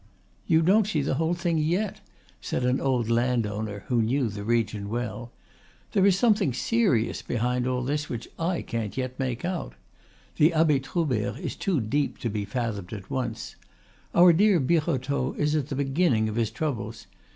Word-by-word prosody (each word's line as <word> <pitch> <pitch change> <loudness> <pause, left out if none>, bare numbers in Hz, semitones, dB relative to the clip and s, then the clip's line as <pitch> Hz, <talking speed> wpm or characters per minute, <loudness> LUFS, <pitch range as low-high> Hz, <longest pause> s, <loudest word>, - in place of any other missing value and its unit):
"You 160 0 +4
don't 200 +4 +4
see 155 -9 0
the 135 - 0
whole 160 +5 0
thing 170 -2 0
yet," 180 +7 -1 0.4
said 125 - -2
an 125 +2 +1
old 125 -4 +1
landowner 110 -4 0
who 120 -2 +1
knew 120 +2 +1
the 100 0 -6
region 110 -2 0
well. 120 +1 -4 0.6
"There 195 0 +4
is 190 -2 +4
something 205 - +3
serious 140 - +1
behind 125 +1 -1
all 125 -1 -1
this 145 +4 -2
which 120 -1 -5
I 170 +1 -1
can't 115 -2 -4
yet 130 -1 -3
make 130 +1 -2
out. 180 -2 -3 0.6
The 160 +3 +4
Abbe 155 -3 +4
Troubert 135 - -1
is - - -5
too 185 -7 0
deep 140 +6 -1
to 115 - -1
be 105 -1 -2
fathomed 105 -3 -3
at 100 -3 -8
once. 120 -4 -3 0.6
Our 175 0 +8
dear 200 +1 +4
Birotteau 140 -3 0
is 150 0 +1
at 145 -4 0
the 140 - -3
beginning 135 -4 +1
of 110 - -4
his 115 -2 +1
troubles. 115 -4 -4
130 Hz, 175 wpm, -26 LUFS, 115-160 Hz, 0.6 s, Our